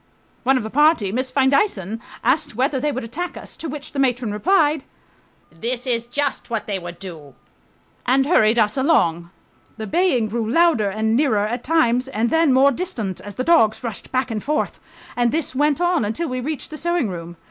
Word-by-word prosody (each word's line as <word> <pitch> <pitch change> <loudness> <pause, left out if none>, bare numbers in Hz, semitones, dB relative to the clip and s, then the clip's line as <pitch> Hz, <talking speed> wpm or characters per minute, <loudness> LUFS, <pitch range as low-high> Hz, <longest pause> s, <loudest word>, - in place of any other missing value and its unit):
One 265 +1 +3
of 255 - -2
the 220 - -6
party, 295 - +3
Miss 255 +4 -2
Findeisen, 260 - +1 0.2
asked 300 -4 +1
whether 265 +3 0
they 295 +3 0
would 260 -3 -4
attack 325 +11 -5
us, - - -8
to 325 - -5
which 290 +1 -7
the 280 - -4
matron 250 -4 +1
replied, 310 - +2 0.7
"That 235 +8 -4
is 235 -2 -1
just 285 +2 -2
what 225 -2 -2
they 200 -2 -3
would 175 -1 -8
do," 165 -7 -10 0.7
and 265 +2 +3
hurried 230 -8 +4
us 215 +2 +2
along. 170 - +2 0.5
The 220 - -5
baying 250 - +1
grew 225 0 -2
louder 310 -7 +3
and 220 +3 0
nearer 230 -7 +2
at 235 +3 -3
times 260 -5 +2
and 230 -2 -1
then 325 -3 +4
more 265 +2 +5
distant, 240 - -4
as 205 0 -9
the 255 - -2
dogs 260 -9 +3
rushed 230 -4 -6
back 255 -1 0
and 215 -2 -3
forth, 300 +1 -1 0.4
and 240 -1 +2
this 315 -4 -1
went 290 +3 +1
on 350 -5 +2
until 225 +11 -2
we 255 0 -3
reached 295 +3 -5
the 310 - -6
sewing 345 -4 0
room. 170 -2 -7
255 Hz, 195 wpm, -21 LUFS, 215-295 Hz, 0.7 s, more